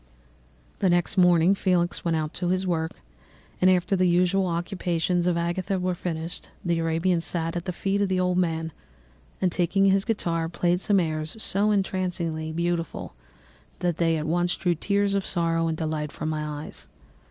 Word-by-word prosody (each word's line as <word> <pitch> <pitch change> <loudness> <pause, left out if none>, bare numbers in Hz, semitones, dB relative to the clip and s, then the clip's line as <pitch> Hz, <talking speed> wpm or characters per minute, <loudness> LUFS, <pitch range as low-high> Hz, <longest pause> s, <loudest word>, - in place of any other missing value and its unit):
"The 190 - +3
next 175 +2 +1
morning 180 -1 +5
Felix 180 -3 0
went 165 -2 +1
out 155 -1 -3
to 180 - -2
his 185 +1 0
work, 160 -3 -1 0.7
and 185 - +6
after 185 +1 +2
the 185 -1 +3
usual 180 +2 +2
occupations 175 0 -1
of 175 -1 +2
Agatha 175 +3 -1
were 180 0 0
finished, 170 0 -5 0.2
the 170 -1 +1
Arabian 165 +2 +1
sat 165 0 -2
at 175 0 -3
the 180 - -1
feet 195 +3 -1
of 200 - +1
the 185 -1 +1
old 180 0 +1
man, 165 -2 -1 0.7
and 185 -2 +2
taking 190 +3 +2
his 195 0 +3
guitar, 170 -7 -1
played 175 +1 +1
some 200 +1 +3
airs 155 -2 -2
so 205 0 +2
entrancingly 180 -5 -1
beautiful 170 0 -2 0.6
that 175 -3 -1
they 165 -1 +2
at 155 - -3
once 175 +2 +1
drew 175 -2 +1
tears 200 +4 0
of 200 -1 +1
sorrow 165 -2 0
and 160 -1 -1
delight 155 -2 -2
from 155 - -4
my 150 -1 -3
eyes. - - -9
175 Hz, 175 wpm, -26 LUFS, 165-185 Hz, 0.7 s, and